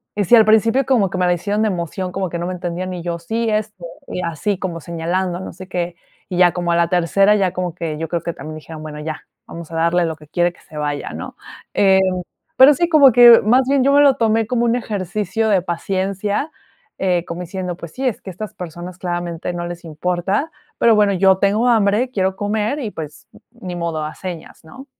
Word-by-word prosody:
Y 205 -1 0
sí, 240 - +6
al 225 - +7
principio 225 +4 +3
como 225 -8 +2
que 185 - -4
me 180 - +1
la 180 - +3
hicieron 205 +5 -1
de 220 - +2
emoción, 180 0 -4
como 190 -1 -3
que 170 - -4
no 170 - -3
me - - -3
entendían, 180 +1 -4
y 180 - -5
yo 170 -1 -3
sí, 225 +6 -2
este, 215 -4 -3 0.2
y 180 - -4
así 170 +4 -2
como 170 -3 -4
señalando, 175 +2 -2
no 190 - -7
sé 185 0 -11
qué, 175 -1 -3 0.3
y 180 - -3
ya 180 -1 +5
como 175 0 -1
a - - +2
la 170 -1 +2
tercera, 185 +4 +3
ya 190 -3 +1
como 180 -2 -3
que 160 -3 -4
yo 165 0 -4
creo 170 -1 -1
que 170 - -4
también 155 0 -8
dijeron, 155 0 -10
bueno, 150 -1 -7
ya, 155 -1 -6 0.2
vamos 170 -1 -9
a - - -6
darle 170 +2 +2
lo 160 -1 -3
que 150 0 -16
quiere, 175 +3 +1
que - - -23
se 155 - -17
vaya, 145 -1 -3
¿no? - - -8 0.4
Eh, 190 -1 +4 0.6
pero 270 +3 +8
sí, 345 +5 0
como 285 -5 +7
que 240 -1 +9
más 245 +5 +4
bien 280 -1 +3
yo 280 - +3
me 285 - +6
lo 280 -2 +5
tomé 225 -1 +2
como 240 0 0
un 235 0 +2
ejercicio 215 -1 -2
de 190 -3 +3
paciencia, 195 - -2 0.5
eh, 180 -3 +1
como 170 +1 -6
diciendo, 180 0 -5
pues 170 -2 -10
sí, 265 - -4
es 240 - -2
que - - -9
estas 195 +3 -7
personas 175 +1 -8
claramente 175 -1 -4
no 175 0 -4
les 175 0 -8
importa, 180 - -2 0.3
pero 230 -1 +4
bueno, 205 -1 +3
yo 190 0 +4
tengo 210 +5 +2
hambre, 225 +2 +2
quiero 190 -3 0
comer 215 +7 -1
y, 230 -7 -4
pues, 150 -4 -9 0.2
ni 190 -7 -8
modo, 165 -2 -2
a 155 - -7
señas, 180 -4 -8
¿no? 260 - -12
185 Hz, 230 wpm, -19 LUFS, 170-215 Hz, 0.6 s, que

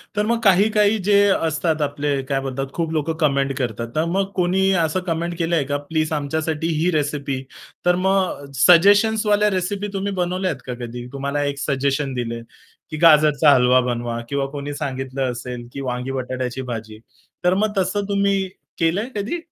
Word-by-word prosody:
तर 210 - +1
मग 235 +1 +1
काही-काही 210 +2 +4
जे 205 -1 +5 0.3
असतात 160 0 -1
आपले 145 -1 -1
काय 135 -1 +1
बोलतात 135 0 -3
खूप 165 -2 -2
लोक 155 0 -1
कमेंट 140 -2 +2
करतात. 115 -2 -3
तर 155 - +1
मग 195 0 0
कोणी 190 +1 +2
असं 160 +4 -1
कमेंट 170 +1 -2
केलंय 165 -2 +1
का - - +2
प्लीज 155 +2 -2
आमच्यासाठी 155 +2 -2
ही 175 - +2
रेसिपी, 145 -3 -2 0.4
तर 180 0 +4
मग 190 -6 +1 0.2
सजेशन्सवाल्या 210 +3 +5
रेसिपी 195 +2 -2
तुम्ही 200 +1 -2
बनवल्यात 185 +1 -2
का 125 - -4
कधी 120 +1 -7
तुम्हाला 140 +1 -2
एक 140 -1 -2
सजेशन 140 0 -1
दिलं 115 -2 -4 0.5
की 155 - -5
गाजरचा 150 -2 +6
हलवा 125 0 +4
बनवा 120 -1 -3
किंवा 140 -1 -1
कोणी 145 0 -5
सांगितलं 135 -2 -3
असेल 120 0 -7
की 140 - -5
वांगी 125 0 -3
बटाट्याची 130 -1 -3
भाजी. 110 -4 -6 0.4
तर 180 +1 +4
मग 210 +2 0
तसं 190 +2 0
तुम्ही 200 -1 +1 0.3
केलंय 185 +9 +1
कधी? 210 +12 -2
155 Hz, 165 wpm, -21 LUFS, 135-190 Hz, 0.5 s, गाजरचा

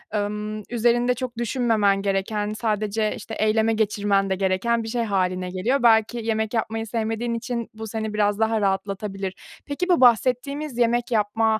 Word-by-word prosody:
ımm, 210 +1 -3
üzerinde 240 +1 +2
çok 250 -1 -5
düşünmemen 225 -4 +1
gereken, 205 +2 -1
sadece, 215 -1 -1
işte, 225 - -9
eyleme 220 +1 +2
geçirmen 205 -2 +1
de 190 - +1
gereken 195 +5 0
bir 225 - -6
şey 235 +1 -1
hâline 185 -3 -1
geliyor. 235 +9 0
Belki 225 0 +4
yemek 220 -1 -1
yapmayı 225 0 -2
sevmediğin 225 +1 -2
için 235 0 -3
bu 220 0 -7
seni 220 0 -4
biraz 205 -1 +1
daha 220 0 +1
rahatlatabilir. 195 0 -2 0.3
Peki, 305 +6 -3
bu 350 -6 +4
bahsettiğimiz 255 +3 +2
yemek 240 +1 +1
yapma 220 0 +2
220 Hz, 155 wpm, -23 LUFS, 205-235 Hz, 0.3 s, Belki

